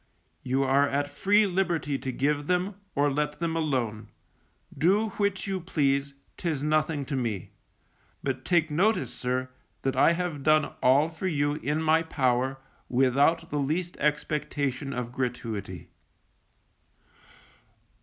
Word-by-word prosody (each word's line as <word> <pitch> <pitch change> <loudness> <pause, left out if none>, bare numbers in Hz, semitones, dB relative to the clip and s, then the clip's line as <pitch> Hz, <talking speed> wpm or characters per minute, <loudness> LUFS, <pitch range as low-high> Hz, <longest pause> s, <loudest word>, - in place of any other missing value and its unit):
You 130 +2 0
are 140 +2 +3
at 145 +1 -1
free 205 +8 +3
liberty 175 -7 0
to 130 - -3
give 145 +3 0
them, 180 +3 +1 0.2
or 145 0 +2
let 150 +1 -1
them 165 -1 -1
alone; 130 -9 -1 0.7
do 205 +7 +2
which 200 -2 0
you 195 -2 -2
please, 140 -5 0 0.2
'tis 155 -6 -2
nothing 155 -1 +1
to 140 - -3
me; 115 -8 -3 0.7
but 130 -1 -2
take 170 -3 +2
notice, 190 +5 +1
sir, 130 +1 -2 0.3
that 135 - 0
I 170 - +5
have 170 -4 -3
done 155 +1 +3
all 135 +4 +5
for 165 +3 -4
you 145 -4 +1
in 150 +1 -2
my 160 +1 +4
power, 130 -4 0 0.3
without 135 +6 +2
the 145 - 0
least 165 +6 -1
expectation 145 -2 -1
of 125 -3 -4
gratuity. 115 -8 -4
145 Hz, 135 wpm, -27 LUFS, 135-165 Hz, 0.7 s, I